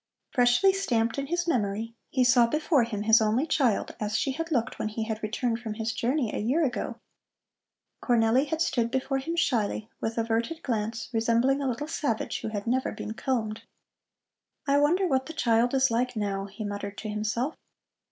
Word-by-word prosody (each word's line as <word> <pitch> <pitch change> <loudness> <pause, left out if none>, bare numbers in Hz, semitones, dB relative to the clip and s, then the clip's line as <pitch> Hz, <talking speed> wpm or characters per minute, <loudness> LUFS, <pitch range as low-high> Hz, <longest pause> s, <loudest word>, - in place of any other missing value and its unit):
Freshly 245 +11 +4
stamped 235 -11 0
in 275 - -3
his 345 +3 -1
memory, 225 -5 -1 0.2
he 260 - +2
saw 245 -1 +5
before 300 0 +2
him 210 -3 -4
his 220 +1 +6
only 220 +6 +2
child 260 -9 +1
as 210 0 -1
she 275 - 0
had 330 +5 -4
looked 250 -3 -1
when - - -1
he 220 +1 -3
had 220 0 -4
returned 230 +2 -1
from 220 -3 -5
his 225 0 -2
journey 245 0 0
a - - -2
year 270 +10 +2
ago. 245 -3 -3 1.1
Cornelli 240 +2 +3
had 320 +3 -2
stood 235 -8 0
before 265 +2 -1
him 330 +6 -3
shyly, 230 -8 0
with 225 +1 -3
averted 230 +8 -1
glance, 225 -1 -2
resembling 235 +5 +2
a 270 - 0
little 275 +5 -3
savage, 280 -8 -2
who - - -4
had 205 -2 -4
never 255 +2 0
been 215 0 -6
combed. 225 -3 -2 1.1
"I 280 +1 +4
wonder 340 +7 +3
what 265 -6 +1
the 320 - -6
child 235 -3 +2
is 265 -2 +3
like 250 +2 0
now?" 200 -2 -2
he 200 +2 -7
muttered 205 0 -5
to 220 - -5
himself. 215 +7 -1
235 Hz, 185 wpm, -27 LUFS, 220-270 Hz, 1.1 s, his